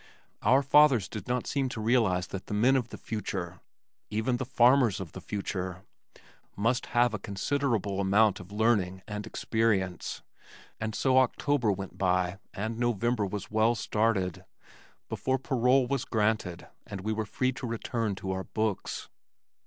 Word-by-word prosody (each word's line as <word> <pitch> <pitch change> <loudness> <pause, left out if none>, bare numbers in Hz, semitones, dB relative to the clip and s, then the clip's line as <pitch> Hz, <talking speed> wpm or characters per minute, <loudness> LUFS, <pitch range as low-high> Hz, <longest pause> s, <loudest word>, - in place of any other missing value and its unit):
Our 130 +6 +4
fathers 135 -6 +5
did 105 -4 -7
not 125 0 -1
seem 135 -2 -1
to 120 - -6
realize 110 -6 +2
that 95 - -6
the 105 - -3
men 125 +6 +4
of 125 -3 0
the - - -8
future 95 -5 -4 0.5
(even 110 +4 0
the 130 - -3
farmers 125 -4 +4
of 90 -5 -6
the 95 - -9
future) 95 -2 -4 0.7
must 115 +5 0
have 120 -1 +4
a 110 - -2
considerable 105 -1 -1
amount 100 +1 +3
of 90 +1 -11
learning 100 -4 +1
and 105 0 -5
experience, 100 -6 -1 0.6
and 110 0 -3
so 130 -1 +4
October 130 -2 +2
went 95 0 -6
by 90 0 +1
and 110 +3 -4
November 120 -2 +1
was 105 +1 -6
well 110 +2 +3
started 105 -5 0 0.6
before 130 0 -1
parole 130 0 +2
was 135 0 -1
granted 105 -5 -1 0.2
and 100 -2 -6
we 110 +3 -1
were 110 -1 -2
free 130 +4 0
to 125 -1 -6
return 115 -2 -2
to 95 0 -4
our 95 0 -3
books. 110 -3 -2
110 Hz, 155 wpm, -29 LUFS, 95-120 Hz, 0.7 s, fathers